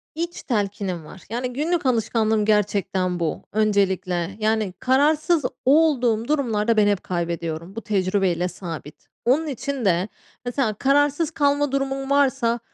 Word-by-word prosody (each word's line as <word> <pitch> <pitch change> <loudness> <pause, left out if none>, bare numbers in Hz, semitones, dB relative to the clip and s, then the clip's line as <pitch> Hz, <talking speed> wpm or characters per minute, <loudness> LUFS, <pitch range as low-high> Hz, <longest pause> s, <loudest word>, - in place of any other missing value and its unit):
iç 340 +2 -4
telkinim 200 - -2
var. 180 +4 -12
Yani, 245 +2 -3
günlük 315 +4 -1
alışkanlığım 220 -3 +1
gerçekten 195 -4 +1
bu 165 -2 -2
öncelikle. 195 -4 0
Yani 215 -3 0
kararsız 300 +4 +2 0.2
olduğum 255 -6 +3
durumlarda 230 -7 +1
ben 210 -1 +5
hep 205 -2 +1
kaybediyorum. 170 0 -4
Bu 225 - -4
tecrübeyle 185 -4 0
sabit. 165 -5 -8 0.2
Onun 285 +7 +2
için 275 -2 -3
de 180 0 +2 0.4
mesela 245 -2 0
kararsız 290 - +2
kalma 285 -2 +1
durumum 270 0 -2
varsa 270 -4 +2
225 Hz, 125 wpm, -23 LUFS, 190-275 Hz, 0.4 s, ben